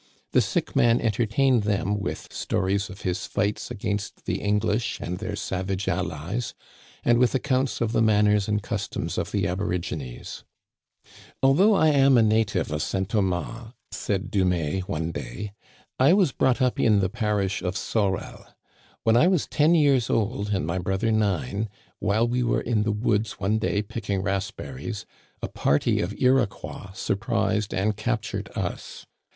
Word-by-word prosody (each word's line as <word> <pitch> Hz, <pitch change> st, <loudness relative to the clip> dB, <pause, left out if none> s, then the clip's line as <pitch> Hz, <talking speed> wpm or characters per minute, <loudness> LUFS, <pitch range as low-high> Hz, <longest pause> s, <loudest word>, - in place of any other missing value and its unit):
The -, -, +4 dB
sick -, -, -2 dB
man 120 Hz, 0 st, +4 dB
entertained 120 Hz, +3 st, +2 dB
them 105 Hz, 0 st, 0 dB
with 100 Hz, -, -5 dB
stories 100 Hz, +2 st, -1 dB
of 100 Hz, -, -10 dB
his 90 Hz, -1 st, -2 dB
fights 105 Hz, 0 st, -1 dB
against 100 Hz, -3 st, -4 dB
the -, -, -2 dB
English 105 Hz, +2 st, 0 dB
and 90 Hz, +1 st, -4 dB
their 105 Hz, -1 st, -4 dB
savage 95 Hz, 0 st, -3 dB
allies, 100 Hz, +11 st, -2 dB, 0.5 s
and 120 Hz, 0 st, +4 dB
with 125 Hz, +1 st, +3 dB
accounts 130 Hz, -1 st, 0 dB
of 115 Hz, -2 st, +1 dB
the 115 Hz, -, +2 dB
manners 105 Hz, -2 st, +3 dB
and 105 Hz, -1 st, 0 dB
customs 105 Hz, -3 st, -3 dB
of -, -, -3 dB
the -, -, 0 dB
aborigines. 85 Hz, -9 st, -4 dB, 1.0 s
Although 185 Hz, +11 st, +5 dB
I 160 Hz, -4 st, +4 dB
am 135 Hz, -3 st, +5 dB
a 115 Hz, -, +6 dB
native 105 Hz, -6 st, +1 dB
of 75 Hz, 0 st, -1 dB
St. 95 Hz, +2 st, -1 dB
Thomas," 110 Hz, +3 st, -2 dB, 0.2 s
said 100 Hz, 0 st, -2 dB
Du 100 Hz, -2 st, +2 dB
mais 90 Hz, -2 st, 0 dB
one 80 Hz, +1 st, -2 dB
day, 100 Hz, +7 st, -6 dB, 0.2 s
" -, -, -32 dB
I 135 Hz, +7 st, +6 dB
was 190 Hz, -7 st, +4 dB
brought 130 Hz, +1 st, +2 dB
up 125 Hz, -, +1 dB
in 105 Hz, -3 st, +4 dB
the 95 Hz, -, +2 dB
parish 105 Hz, -2 st, -1 dB
of 90 Hz, +1 st, -2 dB
Sorel. 100 Hz, -4 st, -2 dB, 0.6 s
When 115 Hz, -, +4 dB
I 140 Hz, +9 st, +6 dB
was 185 Hz, -5 st, +2 dB
ten 155 Hz, +3 st, +3 dB
years 140 Hz, -7 st, +3 dB
old 105 Hz, -1 st, 0 dB
and 95 Hz, -5 st, 0 dB
my 85 Hz, +3 st, -1 dB
brother 95 Hz, +5 st, 0 dB
nine, 105 Hz, -, 0 dB, 0.3 s
while 110 Hz, +4 st, +2 dB
we 125 Hz, +1 st, 0 dB
were 120 Hz, -, +1 dB
in 115 Hz, -3 st, 0 dB
the 110 Hz, 0 st, +1 dB
woods 105 Hz, 0 st, 0 dB
one 105 Hz, +2 st, 0 dB
day 105 Hz, -1 st, 0 dB
picking 100 Hz, -3 st, -3 dB
raspberries 95 Hz, -, -4 dB, 0.4 s
a -, -, 0 dB
party 70 Hz, -, +1 dB
of 95 Hz, +4 st, -3 dB
Iroquois 125 Hz, -6 st, 0 dB
surprised 100 Hz, +1 st, -1 dB
and 105 Hz, +3 st, 0 dB
captured 110 Hz, +1 st, -3 dB
us. -, -, -5 dB
105 Hz, 160 wpm, -25 LUFS, 95-120 Hz, 1.0 s, a